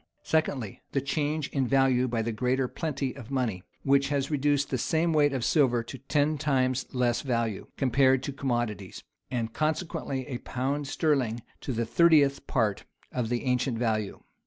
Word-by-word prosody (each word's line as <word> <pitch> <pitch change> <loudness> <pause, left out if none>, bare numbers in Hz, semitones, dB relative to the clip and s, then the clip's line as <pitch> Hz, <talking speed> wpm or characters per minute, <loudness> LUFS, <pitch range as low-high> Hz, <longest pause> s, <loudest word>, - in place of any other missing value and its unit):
Secondly, 140 -9 -1
the 140 - +2
change 145 +2 -1
in 135 -3 0
value 130 -1 +3
by 115 -2 -1
the 115 - -1
greater 125 +4 0
plenty 140 -3 -3
of 120 - -10
money, 125 -9 -1 0.2
which 140 0 +3
has 140 0 -1
reduced 145 -1 +1
the 130 - +1
same 165 +5 +1
weight 145 -2 +4
of 130 -4 -1
silver 125 -7 +3
to 125 +3 -9
ten 145 +2 +1
times 130 -3 +1
less 125 -2 +1
value, 115 -6 -1
compared 130 0 +3
to 140 - -4
commodities; 120 -8 -3 0.3
and 115 -3 -2
consequently 155 -4 -2
a 130 -5 -5
pound 140 +3 -2
sterling 130 -7 0 0.2
to - - -4
the 115 -1 -1
thirtieth 145 +1 +4
part 110 -6 0 0.3
of 120 -3 -2
the 120 0 -1
ancient 125 -1 0
value. 110 -3 -1
130 Hz, 165 wpm, -28 LUFS, 120-145 Hz, 0.3 s, weight